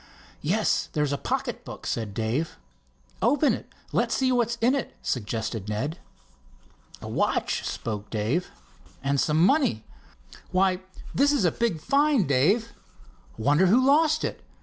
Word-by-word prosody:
"Yes, - - +1
there's 150 -2 0
a - - 0
pocket - - -3
book," - - -9
said 105 -3 -3
Dave. 115 +9 -2 0.6
"Open 290 0 +3
it—let's - - -3
see 260 -1 +2
what's 235 -2 +1
in 240 +3 +3
it," 275 - -3
suggested 110 -3 -3
Ned. 140 +11 -3 1.0
"A - - -6
watch," - - 0
spoke 105 -2 -4
Dave. 115 +11 -1 0.5
"And 140 0 +1
some 155 +4 +3
money. 200 - +2 0.7
Why, 185 0 +2 0.3
this 285 +2 +4
is 280 -10 +2
a 170 - +4
big 230 -9 -1
find, 280 - +2
Dave! 190 - +2 0.6
Wonder 145 +11 +3
who 220 +8 +5
lost 310 +2 +4
it? - - -4
175 Hz, 135 wpm, -26 LUFS, -, 1.0 s, who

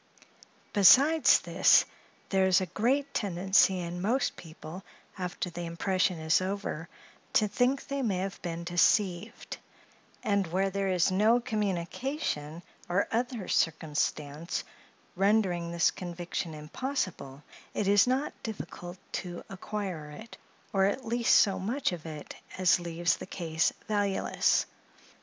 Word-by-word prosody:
Besides 275 +10 +6
this, - - +5 0.4
there 190 -1 +3
is 185 -1 +5
a 185 - -1
great 260 - 0
tendency 190 0 +2
in 175 0 -4
most 240 +8 0
people, 160 +2 -10 0.3
after 180 -1 -4
the 170 0 -5
impression 185 +1 0
is 160 +3 +2
over, 185 -4 -4 0.4
to 215 - +4
think 250 +6 +1
they 280 0 -3
may 210 -7 0
have 190 +1 -4
been 170 -1 -4
deceived; 180 +3 +1 0.7
and 200 -3 +1
where 190 +3 0
there 195 0 -1
is 185 -1 +2
no 215 +5 +4
communication 195 - -3 0.3
or 185 +3 +1
other 235 -3 -2
circumstance 155 0 -1 0.5
rendering 190 -3 +2
this 170 -1 +3
conviction 175 -2 -5
impossible, 150 - -4 0.3
it 205 - 0
is 205 +2 +5
not 265 +4 0
difficult 185 -5 -7
to 175 -2 -5
acquire 190 -5 -5
it, 220 +10 -11 0.4
or 195 -1 +3
at 220 +6 -1
least 235 0 +3
so 195 - +4
much 235 +7 -1
of 165 -2 -7
it 150 -2 -8 0.2
as 185 -1 +4
leaves 170 0 0
the - - -8
case 165 -4 0 0.2
valueless. 205 -2 +1
190 Hz, 130 wpm, -29 LUFS, 170-210 Hz, 0.7 s, Besides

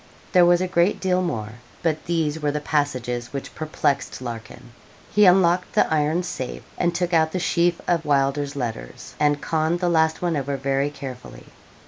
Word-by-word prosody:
There 180 -3 +6
was 175 0 +4
a 185 - 0
great 175 +2 +2
deal 185 -1 +1
more, 115 -9 -4 0.2
but 160 -2 -1
these 160 -2 0
were 150 -1 0
the 150 - -2
passages 130 -6 -2
which 140 - -6
perplexed 155 -2 -1
Larkin. 120 0 -8 0.4
He 210 -2 +5
unlocked 180 -1 +4
the - - +5
iron 155 +3 +1
safe, 130 -8 -5
and 175 0 0
took 180 0 -1
out 160 -1 +3
the - - 0
sheaf 170 -1 +1
of 170 -2 +1
Wylder's 140 0 0
letters, 115 - -6
and 145 -1 +2
conned 160 +2 0
the 175 -1 +1
last 160 -1 +2
one 175 -2 0
over 140 -1 -2
very 135 +1 0
carefully. 130 -3 -9
155 Hz, 175 wpm, -23 LUFS, 135-175 Hz, 0.4 s, There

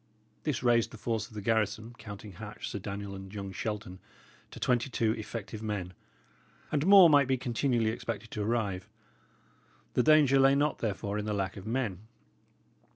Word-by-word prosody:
This 145 -5 -1
raised 120 -2 +3
the 115 - -11
force 115 0 -2
of 110 - -16
the 105 - -5
garrison, 110 +1 0
counting 105 -1 -9
Hatch, 85 - -8
Sir - - -4
Daniel, 100 0 -5
and 95 0 -9
young 100 -2 -6
Shelton, 100 -2 -5 0.5
to - - -10
twenty 125 +1 +1
two 115 -3 +1
effective 110 0 -5
men. 100 -4 -3 0.8
And 150 +2 +1
more 195 -3 +10
might 145 -3 +5
be 130 0 +2
continually 120 -2 0
expected 115 -1 -5
to 105 - -3
arrive. 105 -4 -1 1.0
The - - +3
danger 145 -1 +5
lay 135 +1 +6
not 145 +2 +1
therefore 105 -1 -2
in 105 - -3
the 105 - -1
lack 95 -2 -2
of 100 +1 -9
men. 110 -5 -2
110 Hz, 170 wpm, -30 LUFS, 100-125 Hz, 1.0 s, more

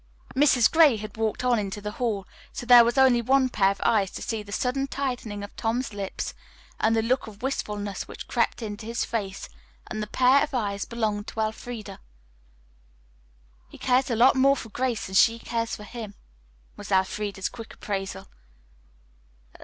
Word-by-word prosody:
Mrs. 260 -4 +5
Gray 315 -8 +6
had 210 -1 -8
walked 220 +2 -1
on 245 -2 +3
into 200 0 -4
the 210 0 -5
hall, 210 -4 -2 0.3
so - - -6
there 245 -1 +9
was 235 +2 0
only 260 -3 +5
one 260 +2 +3
pair 195 -5 +3
of 195 - -3
eyes 205 -4 +3
to - - -6
see 220 -1 -3
the 205 -1 -12
sudden 270 +4 -1
tightening 245 -7 -4
of 205 - -9
Tom's 230 +1 -2
lips 200 -2 -4 0.5
and 225 +1 +3
the 225 - +2
look 250 +2 0
of 215 +1 -12
wistfulness 210 -6 -3
which - - -9
crept - - 0
into 215 0 -6
his 230 0 -1
face, 200 -4 -4 0.4
and 215 - -5
that 210 - -6
pair 260 +2 +5
of 295 -2 -2
eyes 200 -4 -1
belonged 215 -3 -2
to - - -7
Elfreda. 220 +1 -5 1.7
"He - - -13
cares 255 +1 +2
a - - 0
whole - - -1
lot 250 +4 +6
more 275 +1 +5
for 230 - -7
Grace 245 0 -2
than 190 - -8
she 230 +4 +5
cares 230 0 -3
for 210 - -10
him," 210 -1 -8 0.6
was - - -9
Elfreda's 195 +1 0
quick 230 -2 -10
appraisal. 195 -1 -4
225 Hz, 180 wpm, -26 LUFS, 205-250 Hz, 1.7 s, there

